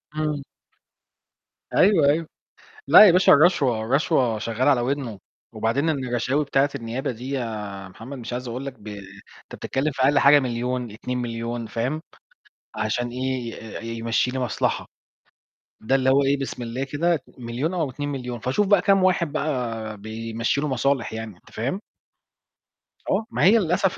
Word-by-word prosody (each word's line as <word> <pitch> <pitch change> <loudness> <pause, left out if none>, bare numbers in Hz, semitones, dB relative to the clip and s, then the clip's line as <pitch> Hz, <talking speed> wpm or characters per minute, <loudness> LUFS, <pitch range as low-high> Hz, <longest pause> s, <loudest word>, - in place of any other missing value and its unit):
إمم. 150 -2 -1 1.3
أيوه 180 -7 +5
أيوه. 155 +2 +1 0.6
لأ 215 - +10
يا 190 - +8
باشا 180 +2 +6
الرشوة، 145 -7 +4
الرشوة 125 -2 +1
شغّالة 115 +6 +1
على 130 -4 +3
ودنه. 125 -4 -2 0.3
وبعدين 115 +8 0
الرشاوي 130 0 0
بتاعة 140 0 +2
النيابة 120 +1 -3
دي 125 +3 -7
يا 105 -7 -4
محمد 130 +8 -9
مش 120 0 -7
عايز 125 +1 -4
أقول 125 +4 -5
لك 140 - -4
ب 105 - -17
أنت 100 -2 -12
بتتكلّم 140 +3 -2
في 130 -1 -2
أقل 140 +2 +4
حاجة 145 +1 +7
1,000,000، 125 -1 -2
2,000,000، 115 0 -4
فاهم، 130 +9 -2 0.7
عشان 110 +3 -1
إيه، 125 -1 -3 0.3
ي 115 0 -5
يمشي 115 +2 +1
لي 130 - -4
مصلحة. 125 -4 -1 1.0
ده 120 +5 +1
اللي 130 -1 +2
هو 140 +1 +4
إيه 140 +1 +2
بسم 130 -2 -4
الله 120 +3 -3
كده 155 +4 0 0.2
1,000,000 125 +7 -3
أو 165 -6 -1
2,000,000. 130 -3 -5
فشوف 130 - 0
بقى 200 -2 +5
كام 195 -2 +3
واحد 175 -4 +2
بقى 120 -8 -3
بيمشي 115 +5 -2
له 150 - -1
مصالح 135 -2 0
يعني، 110 -3 -6
أنت - - -21
فاهم؟ 135 - -2 1.3
آه، 220 - +1
ما - - 0
هي 205 +6 +7
للأسف 185 -1 +1
130 Hz, 155 wpm, -24 LUFS, 115-145 Hz, 1.3 s, لأ